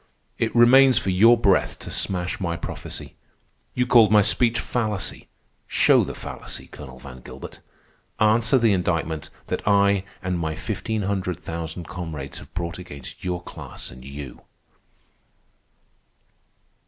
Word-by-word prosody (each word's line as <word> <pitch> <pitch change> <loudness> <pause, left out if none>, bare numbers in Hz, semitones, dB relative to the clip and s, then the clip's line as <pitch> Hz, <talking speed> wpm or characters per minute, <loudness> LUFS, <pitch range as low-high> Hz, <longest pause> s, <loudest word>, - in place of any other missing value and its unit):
It 115 0 -1
remains 130 +1 +7
for 95 - +1
your 115 +6 +6
breath 100 -4 +2
to - - -8
smash 90 -2 -1
my 85 -3 -1
prophecy. - - -6 0.6
You 125 - +2
called 115 -4 +6
my 105 -1 +6
speech 115 +2 +2
fallacy. 110 -5 -2 0.4
Show - - +4
the - - -5
fallacy, - - -7
Colonel 65 -3 -11
Van 65 -1 -11
Gilbert. - - -10 0.6
Answer 110 +3 +4
the 115 -4 +4
indictment 80 -4 -1 0.2
that - - -3
I 100 -1 +4 0.2
and 90 -1 -1
my 80 -1 -2
fifteen 110 +6 -3
hundred 95 -3 -1
thousand 85 0 -6
comrades 80 -6 -6
have - - -14
brought 85 0 -4
against 70 -4 -10
your 90 -1 -3
class - - -8
and 65 +1 -12
you." 70 -1 -8
90 Hz, 135 wpm, -24 LUFS, 80-110 Hz, 0.6 s, remains